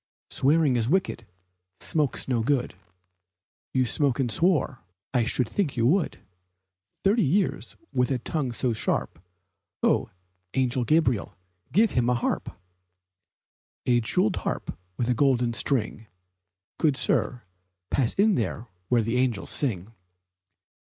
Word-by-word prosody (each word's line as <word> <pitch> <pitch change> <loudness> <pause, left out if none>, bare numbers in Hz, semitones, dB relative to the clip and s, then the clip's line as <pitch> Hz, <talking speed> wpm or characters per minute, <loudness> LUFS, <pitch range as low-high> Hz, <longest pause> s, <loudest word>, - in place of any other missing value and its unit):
Swearing 145 -2 +3
is 115 0 0
wicked, 170 - 0 0.5
smoke's 150 -4 +1
not 120 -4 0
good. 135 -2 0 1.0
He 130 -1 +2
smoked 140 +2 +1
and 125 -4 0
swore 145 - +2 0.3
I 120 -3 +2
should 125 0 +1
think 180 - -1
he 115 - +1
would, 160 +9 +1 0.8
Thirty 210 +4 +3
years 185 +4 0 0.2
with 125 0 +1
that 130 -3 -2
tongue 145 -6 -1
so 120 +1 -1
sharp! 110 - -1 0.6
Ho, - - +2 0.5
Angel 130 -1 +1
Gabriel! 150 -11 +1 0.3
Give 210 - +4
him 120 -1 +1
a 125 - +3
harp! 120 - -1 1.4
A 120 -1 +3
jeweled 180 - +1
harp - - -3 0.2
with 120 - -1
a 125 - +3
golden 125 -2 +2
string, 115 -3 -1 0.7
Good 150 -5 +2
sir, 125 -1 0 0.5
pass 130 -5 +2
in 210 +1 +4 0.5
where 120 -2 +2
the 115 +3 -1
angels 125 -6 0
sing! 110 -6 -1
130 Hz, 125 wpm, -26 LUFS, 120-150 Hz, 1.4 s, Give